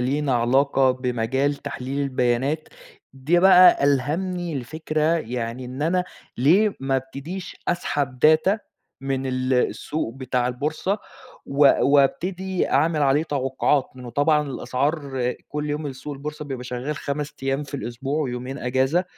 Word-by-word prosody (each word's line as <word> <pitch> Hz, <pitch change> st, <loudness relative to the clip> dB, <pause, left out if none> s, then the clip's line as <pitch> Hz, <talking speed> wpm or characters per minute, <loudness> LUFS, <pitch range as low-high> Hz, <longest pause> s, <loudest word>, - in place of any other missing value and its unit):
لينا 135 Hz, +1 st, 0 dB
علاقة 130 Hz, +2 st, +3 dB
بمجال 130 Hz, +2 st, 0 dB
تحليل 140 Hz, -1 st, -5 dB
البيانات. 135 Hz, +3 st, 0 dB, 0.4 s
دي 135 Hz, +6 st, +1 dB
بقى 180 Hz, -5 st, +7 dB
ألهمني 160 Hz, +4 st, 0 dB
لفكرة 155 Hz, +4 st, -3 dB, 0.2 s
يعني 120 Hz, -1 st, -4 dB
إن 130 Hz, +3 st, -5 dB
أنا 180 Hz, +3 st, +1 dB, 0.3 s
ليه 190 Hz, -, +4 dB
ما 135 Hz, 0 st, +1 dB
أبتديش 140 Hz, +8 st, -6 dB
أسحب 145 Hz, -7 st, -1 dB, 0.2 s
data 190 Hz, +7 st, +1 dB, 0.5 s
من 135 Hz, -1 st, -2 dB
ال 130 Hz, 0 st, -1 dB
السوق 125 Hz, 0 st, -1 dB
بتاع 125 Hz, -2 st, -1 dB
البورصة، 155 Hz, -, -2 dB, 0.5 s
و 140 Hz, 0 st, +5 dB
وابتدي 180 Hz, +7 st, +1 dB
أعمل 155 Hz, -2 st, +2 dB
عليه 140 Hz, +2 st, +3 dB
توقعات. 135 Hz, -2 st, 0 dB
لإنه 125 Hz, -2 st, -9 dB
طبعًا 150 Hz, +3 st, +2 dB
الأسعار 140 Hz, 0 st, -2 dB, 0.3 s
كل 150 Hz, 0 st, -3 dB
يوم 150 Hz, +1 st, -3 dB
السوق 140 Hz, +2 st, -6 dB
البورصة 150 Hz, +2 st, -6 dB
بيبقى 130 Hz, -3 st, -6 dB
شغّال 125 Hz, +4 st, -4 dB
5 150 Hz, +2 st, -4 dB
أيام 135 Hz, +2 st, 0 dB
في 140 Hz, -, -10 dB
الأسبوع 135 Hz, +4 st, -3 dB
ويومين 130 Hz, 0 st, -4 dB
أجازة. 130 Hz, +8 st, +1 dB
140 Hz, 130 wpm, -23 LUFS, 130-150 Hz, 0.5 s, بقى